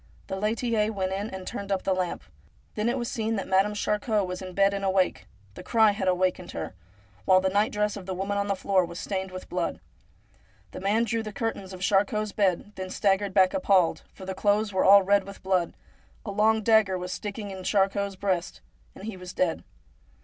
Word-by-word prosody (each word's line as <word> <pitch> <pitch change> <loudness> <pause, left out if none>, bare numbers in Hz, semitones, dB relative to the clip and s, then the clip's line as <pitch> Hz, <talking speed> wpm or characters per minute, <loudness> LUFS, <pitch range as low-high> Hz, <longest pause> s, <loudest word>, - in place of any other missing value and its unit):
The 190 - -4
laitier 220 +1 0
went 190 -2 -2
in 200 +3 -3
and 190 -2 -7
turned 200 +1 -5
up 190 -1 0
the 190 - +1
lamp. 185 -2 -2 0.5
Then 215 +2 0
it 250 - 0
was 240 -2 -2
seen 225 0 -1
that 195 - -3
Madame 195 +2 +2
Charcot 210 0 0
was 180 0 -5
in 185 -1 -8
bed 200 0 +4
and 195 0 -3
awake 190 -1 +1
— 100 -1 -30
the - - -9
cry 220 -2 +4
had 200 -2 -3
awakened 185 0 0
her - - -5 0.3
— 100 0 -30
while 185 0 +6
the 190 0 0
night 205 +2 +2
dress 210 0 0
of 195 -3 -9
the 190 - -3
woman 195 +2 -2
on 200 0 0
the 200 - 0
floor 190 0 +2
was 170 0 -6
stained 190 -1 -3
with 185 0 -8
blood. 180 -1 -2 0.9
The - - -7
man 210 +4 +2
drew 230 0 -1
the 215 -1 -6
cur 225 +2 -1
tains 190 -1 -10
of 185 -1 -9
Charcot's 205 +1 +1
bed, 195 0 0
then 185 0 -5
staggered 195 0 +1
back 185 -2 +5
appalled, 195 -11 +2
for 190 - -11
the 190 - -3
clothes 205 +2 +1
were 190 - +2
all 200 0 +8
red 200 +1 +3
with 200 +1 -11
blood, 185 -2 0 0.5
a 205 - -4
long 220 +2 +2
dagger 215 -4 +4
was 180 0 -4
sticking 205 0 -5
in 190 -1 -7
Charcot's 200 0 +1
breast, 185 -3 -2 0.3
and - - -11
he 220 -2 -5
was 180 0 -9
dead. 180 -3 0
195 Hz, 220 wpm, -27 LUFS, 185-210 Hz, 0.9 s, all